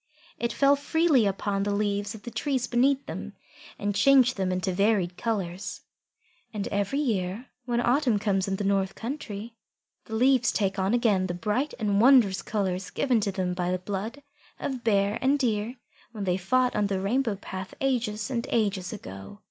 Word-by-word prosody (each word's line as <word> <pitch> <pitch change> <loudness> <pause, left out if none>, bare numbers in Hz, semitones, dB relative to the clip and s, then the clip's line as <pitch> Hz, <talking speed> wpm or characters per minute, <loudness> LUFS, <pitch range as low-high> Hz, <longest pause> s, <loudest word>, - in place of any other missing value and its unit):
It 235 - -1
fell 280 0 +4
freely 285 -4 +2
upon 195 0 -1
the 200 0 0
leaves 205 0 -1
of 210 - -12
the 240 - -7
trees 265 -3 -1
beneath 270 +3 +2
them, - - -6 0.4
and 205 0 -1
changed 255 +4 +5
them 190 -2 -1
into 185 +1 -1
varied 195 -2 +1
colours. 190 -5 -3 0.7
And 205 -2 -3
every 200 +7 -1
year 220 -4 -1 0.2
when 240 -1 0
autumn 245 -2 +2
comes 200 -2 0
in 195 - 0
the 205 - -3
north 195 -1 +1
country, 230 -4 -6 0.5
the 220 - -5
leaves 250 +1 +4
take 195 -2 -1
on 190 +5 +2
again 205 -6 +2
the 175 - -3
bright 215 - -1
and 205 -3 +1
wondrous 230 -8 +5
colours 190 -2 -2
given 255 -4 +1
to 200 -1 -1
them 185 -1 -2
by 180 0 -2
the 185 - +1
blood 205 +9 -5 0.4
of 260 -3 -4
Bear 205 -1 +2
and 275 +2 +3
Deer 230 -2 -1 0.4
when 210 -3 -5
they 180 -2 +1
fought 250 +7 +1
on 210 -1 +2
the 195 -1 -1
Rainbow 225 +3 0
path 190 -1 -7
ages 240 -3 -1
and 235 -2 -2
ages 200 -5 0
ago. 95 - -9
210 Hz, 180 wpm, -27 LUFS, 195-245 Hz, 0.7 s, changed